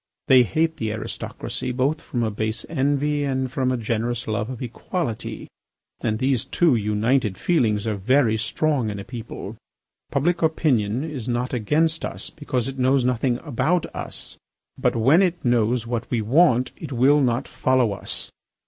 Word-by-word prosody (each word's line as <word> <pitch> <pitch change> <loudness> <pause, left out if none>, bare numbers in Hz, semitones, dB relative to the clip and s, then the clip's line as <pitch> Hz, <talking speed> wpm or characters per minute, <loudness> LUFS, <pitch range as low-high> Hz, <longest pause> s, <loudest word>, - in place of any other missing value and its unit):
They 130 -1 +7
hate 160 +6 +1
the 110 -7 -2
aristocracy 110 +3 -4
both 135 +5 0
from 120 -2 -2
a 110 - 0
base 110 +2 -3
envy 145 0 0
and 130 -2 -1
from 130 -1 0
a 130 - 0
generous 115 +1 -2
love 110 +1 -1
of 130 -3 -6
equality. 125 - -4 0.5
And 110 -1 -1
these 130 -1 +1
two 170 -5 +2
united 105 0 +1
feelings 110 - +1
are 110 -2 -1
very 115 +3 +3
strong 120 +2 0
in 105 - -4
a 100 - -6
people. 120 0 -7 0.5
Public 170 +5 +1
opinion 130 -8 +1
is 140 -7 -5
not 125 +2 -1
against 155 +8 +1
us, - - -5
because 130 -5 -2
it 135 0 -6
knows 130 0 +3
nothing 125 0 +1
about 155 +4 +1
us. - - -6 0.4
But - - 0
when 135 - +5
it 175 -5 0
knows 120 0 +2
what 120 0 -3
we 120 - 0
want 125 +2 +3
it 155 -4 -8
will 135 +4 +4
not 125 0 +1
follow 130 -4 +2
us. - - -6
125 Hz, 165 wpm, -23 LUFS, 115-145 Hz, 0.5 s, They